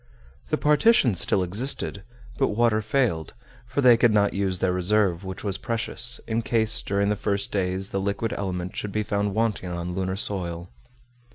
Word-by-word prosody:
The - - +1
partitions 150 - +3
still 95 - +3
existed, 100 +2 -3 0.4
but - - +3
water 110 0 +2
failed, 110 - -1 0.3
for 140 - -1
they 125 -3 +7
could 120 -1 +4
not 105 -1 +2
use 95 -2 -1
their 90 0 0
reserve, 95 0 +1
which 95 0 -7
was 100 -2 -2
precious, 115 +2 +1
in 115 0 0
case 110 -1 0
during 100 +1 0
the 105 - +1
first 100 -1 -2
days 95 0 -2
the 95 - -2
liquid 100 +3 -2
element 90 -2 -4
should 105 - -4
be 105 +2 -1
found 100 -1 -1
wanting 110 -5 -1
on 85 0 -4
lunar 95 +1 -2
soil. 90 -4 -3
100 Hz, 175 wpm, -25 LUFS, 95-115 Hz, 0.4 s, they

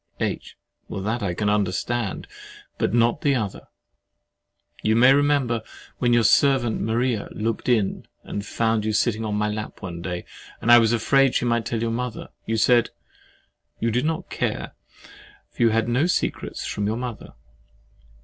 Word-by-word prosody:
H. - - -3 0.3
That 110 +5 -3
I 95 -4 -2
can 105 - -1
understand, 105 +2 -1 0.5
but - - +1
not 120 +4 +2
the 140 -2 +2
other. 105 -6 -4 1.1
You 110 +1 +2
may 125 +3 +7
remember, 140 -5 +2 0.4
when 120 -1 +2
your 120 -1 +4
servant 120 0 +3
Maria 115 0 0
looked 115 +3 -2
in 110 -5 +1 0.2
and 100 - -5
found 110 0 0
you 110 0 -1
sitting 110 +1 +1
in 105 -1 -2
my 105 0 0
lap 105 0 -5
one 85 -2 -6
day, 90 0 -5 0.3
and 120 - +2
I 120 - +10
was 115 -1 +3
afraid 135 +3 +3
she - - +1
might 120 -1 0
tell 115 -1 -2
your 115 -1 -1
mother, 125 0 -4 0.2
you 115 - 0
said 120 +1 +4 0.9
"You 115 - 0
did 125 +5 0
not 160 0 -2
care, - - -2 0.8
for - - -7
you 115 - +5
had 115 0 +1
no 125 +7 +2
secrets 180 - -2
from 100 -1 -2
your 110 +2 -1
mother." 125 -2 -6
115 Hz, 165 wpm, -23 LUFS, 105-120 Hz, 1.1 s, I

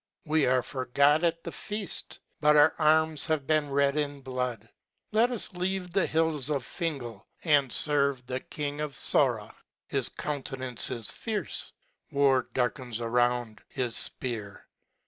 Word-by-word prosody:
We 155 -1 +2
are 130 -1 +2
forgot 140 +5 +2
at 165 -1 0
the - - -5
feaft: 210 -3 -2 0.2
But 150 0 +4
our 150 +1 +6
arms 155 -1 +3
have 155 -4 0
been 155 0 +1
red 140 0 +2
in 145 -2 -2
blood. 125 -4 -4 0.4
Let 225 +3 +3
us 240 -5 -2
leave 180 0 -2
the 195 -2 +2
hills 155 -4 +1
of 140 -4 -1
Fingal, 140 -10 -4 0.2
and 145 -5 +3
ferve 140 -2 +1
the 125 +1 -3
king 145 +1 -5
of 150 -3 -4
Sora. - - +2 0.3
His - - +1
countenance 130 -4 -3
is 115 -3 -3
fierce. 220 -3 -3 0.4
War 140 -3 +2
darkens 125 -1 -2
around 120 -1 0
his 125 -4 -2 0.3
fpear. 110 -6 -5
140 Hz, 145 wpm, -28 LUFS, 125-155 Hz, 0.4 s, our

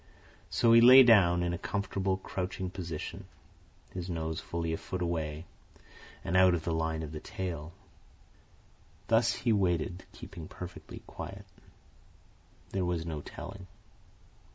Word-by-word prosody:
So 115 -1 +4
he 115 - +8
lay 130 +2 +10
down, 90 -7 +5
in 85 0 -1
a 85 - -4
comfortable 100 -2 -1
crouching 95 -1 -4
position, 85 -5 -6 0.7
his 90 0 -5
nose 80 -2 -3
fully 85 -1 -3
a - - -1
foot 90 - -5
away, 80 -2 -3 0.8
and 85 - -2
out 95 -1 +6
of 80 - -4
the 85 - -1
line 80 0 -1
of 75 - -6
the 75 - -6
tail. 85 -3 -5 1.4
Thus 115 +1 +4
he 115 - +1
waited, 90 -2 0
keeping 80 -2 -10
perfectly 90 -1 -9
quiet. 95 +5 -8 1.3
There 95 -1 -1
was 90 -2 -1
no 80 -3 -4
telling. 95 +5 -9
90 Hz, 135 wpm, -30 LUFS, 80-95 Hz, 1.4 s, lay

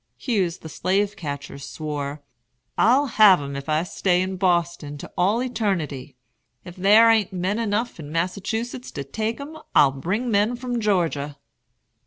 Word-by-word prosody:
Hughes 190 -8 -1
the - - -10
slave 195 +6 0
catcher 145 -6 -6
swore: 145 0 -5 0.5
"I'll 255 +6 +4
have 210 - +6
'em 140 -1 -6
if 140 +2 -6
I 155 +1 +2
stay 180 0 +1
in 190 0 -3
Boston 170 -5 0
to - - -10
all 210 +7 +2
eternity. 170 - -2 0.5
If 175 -1 -10
there 210 +5 +6
a'n't 220 -4 +2
men 190 +4 -1
enough 225 -1 -1
in 145 -2 -8
Massachusetts 200 +9 -3
to 140 - -4
take 220 - -3
'em, 305 +3 -8 0.2
I'll 140 - +6
bring 195 - -2
men 210 +4 +2
from 245 -1 -3
Georgia." 165 -8 0
185 Hz, 155 wpm, -23 LUFS, 150-220 Hz, 0.5 s, have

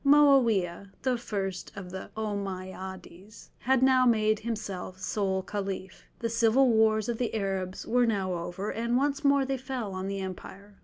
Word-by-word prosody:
Moawiah, 235 -11 +4
the 255 -1 +2
first 195 -6 -4
of 190 -2 -8
the 190 +1 -7
Ommeyades, 190 -2 -6
had 260 +1 +2
now 260 -1 +5
made 215 -3 +3
himself 205 -5 -5
sole 190 -1 -1
Caliph; 195 -2 -5
the 230 - -2
civil 230 +3 +4
wars 220 -1 +3
of 235 -2 -2
the 240 -2 -1
Arabs 190 -3 -2
were 245 +1 +3
now 195 -4 0
over, 175 +4 -4
and 235 +2 0
once 285 +2 0
more 280 -1 +4
they 270 0 -1
fell 250 -6 -4
on 185 +1 -4
the 195 0 -3
empire. 195 +2 -8
210 Hz, 160 wpm, -28 LUFS, 190-240 Hz, -, now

